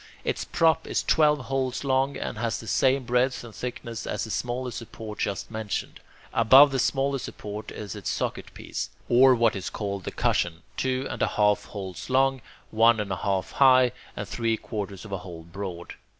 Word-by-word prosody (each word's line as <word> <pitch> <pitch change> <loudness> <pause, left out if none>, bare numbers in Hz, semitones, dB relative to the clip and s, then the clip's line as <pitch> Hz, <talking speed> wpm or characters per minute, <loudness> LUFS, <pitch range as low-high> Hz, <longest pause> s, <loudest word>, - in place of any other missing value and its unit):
Its - - -2
prop 160 -1 +2
is - - 0
twelve 150 -1 +4
holes 130 0 -2
long, 135 0 +1
and - - -4
has 115 -2 -1
the - - -9
same 130 +5 +2
breadth 125 +1 +1
and 115 -2 -10
thickness 115 +1 -6
as - - -2
the 110 - -5
smaller 125 +5 -2
support 110 -2 -8
just 100 +2 -2
mentioned. 110 -3 -4 0.3
Above 135 +5 +7
the 135 - 0
smaller 135 +2 +1
support 105 -2 -7
is 105 -4 -7
its - - -4
socket - - -3
piece, - - -5 0.2
or 130 +2 +6
what 115 -2 +3
is 95 -1 -4
called 100 -2 -4
the - - -4
cushion, 85 -1 0
two 130 0 -1
and - - -5
a - - +3
half 105 -1 +2
holes 95 -2 -7
long, 135 0 +3 0.3
one 115 +1 +5
and 105 -2 -3
a 95 - -1
half 95 -1 -1
high, 130 -2 +5 0.3
and - - -4
three 115 -1 0
quarters 100 -2 -6
of 105 - -10
a 95 - -2
hole 85 -3 -9
broad. 85 0 -7
115 Hz, 190 wpm, -26 LUFS, 100-130 Hz, 0.3 s, Above